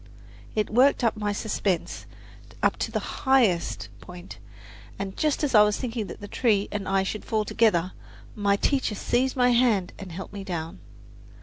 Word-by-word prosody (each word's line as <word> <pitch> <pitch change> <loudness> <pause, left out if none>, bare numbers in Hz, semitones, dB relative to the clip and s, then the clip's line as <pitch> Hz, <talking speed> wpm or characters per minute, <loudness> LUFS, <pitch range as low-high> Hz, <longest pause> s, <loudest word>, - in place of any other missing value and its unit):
It 215 -1 0
worked 255 +4 +4
my 210 -1 -2
suspense 205 -3 -2 0.6
up - - +3
to - - -2
the - - -4
highest 230 -11 +2
point, 180 0 -11 0.6
and 195 -1 -5
just 305 -1 0
as 285 - 0
I 210 - +8
was 210 0 +3
thinking 230 -4 -3
the 205 - -8
tree 210 -3 +1
and 205 -2 -4
I 195 0 +2
should 210 +2 -4
fall 215 -1 -1
together, 190 -6 +2 0.4
my 200 -1 +1
teacher 260 0 0
seized 255 +5 0
my 250 -1 +4
hand 235 -7 +2
and 190 -2 -8
helped 190 +4 -8
me 200 -1 -6
down. 165 - -5
210 Hz, 165 wpm, -26 LUFS, 195-240 Hz, 0.6 s, I